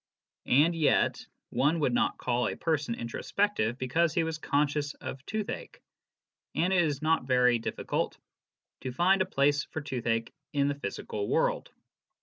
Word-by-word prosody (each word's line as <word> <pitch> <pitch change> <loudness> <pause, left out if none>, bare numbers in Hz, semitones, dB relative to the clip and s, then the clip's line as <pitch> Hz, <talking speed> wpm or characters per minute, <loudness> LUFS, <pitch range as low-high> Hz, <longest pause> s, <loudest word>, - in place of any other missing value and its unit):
And 150 +6 +5
yet 155 -3 +2 0.3
one 155 +5 +2
would 130 -4 +2
not - - +1
call 120 -1 0
a - - -3
person 150 -7 -1
introspective 120 - -1
because 160 +6 +1
he 170 - +3
was 160 -1 -3
conscious 145 0 0
of 130 - -7
tooth 215 -1 -2
ache, - - -8 0.8
and 180 +4 +2
it 180 - +5
is 150 -3 -1
not 160 -4 +2
very 125 -2 +4
difficult 115 - -2 0.6
to 130 - -4
find 185 +8 +3
a 185 - +1
place 145 -2 +2
for - - -5
tooth 130 -5 -5
ache 115 0 0 0.2
in 140 -1 +2
the 140 0 -3
physical 105 -6 -4
world. - - +1
145 Hz, 160 wpm, -29 LUFS, 125-160 Hz, 0.8 s, And